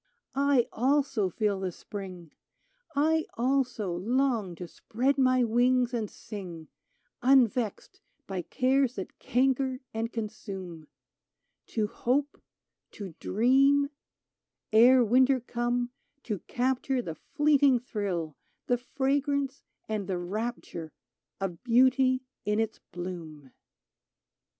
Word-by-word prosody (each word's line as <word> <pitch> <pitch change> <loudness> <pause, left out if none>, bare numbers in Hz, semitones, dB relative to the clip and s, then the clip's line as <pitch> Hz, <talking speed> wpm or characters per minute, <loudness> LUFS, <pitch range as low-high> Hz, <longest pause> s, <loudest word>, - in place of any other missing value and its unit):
" - - -60 0.2
I, 245 -3 +4
also, 265 -5 +1
feel 205 +1 0
the 190 -1 -2
Spring! 185 -4 -8 0.6
I, 315 +2 +2
also, 245 -7 0
long 225 -1 0
to 175 +1 -7
spread 255 - -1
my 255 -1 +4
wings 245 +2 +2
and 220 -4 -2
sing, 175 -7 -9 0.5
Unvexed 245 -4 +2 0.3
by 190 -2 -3
cares 260 - +1
that 190 - -7
canker 260 +1 +1
and 225 +1 -2
consume: 195 -7 -6 0.8
To 220 -2 0
hope, 275 +7 -1 0.5
to 195 -5 -7
dream, 275 +6 +3 0.4
— - - -48
ere 255 -1 +6
winter 255 +4 +4
come, 240 0 -1 0.3
to 210 -5 -3
capture 255 +1 0
The 165 - -4
fleeting 285 - +3
thrill, 190 - -3 0.3
the 245 -1 +1
fragrance 280 +1 -1 0.3
and 215 -3 -3
the 190 -2 -1
rapture 175 -3 -4 0.5
Of 185 -4 -4
beauty 255 +1 +4 0.2
in 210 +1 0
its 225 -1 -1
bloom 165 -6 -7
240 Hz, 110 wpm, -29 LUFS, 195-260 Hz, 0.8 s, ere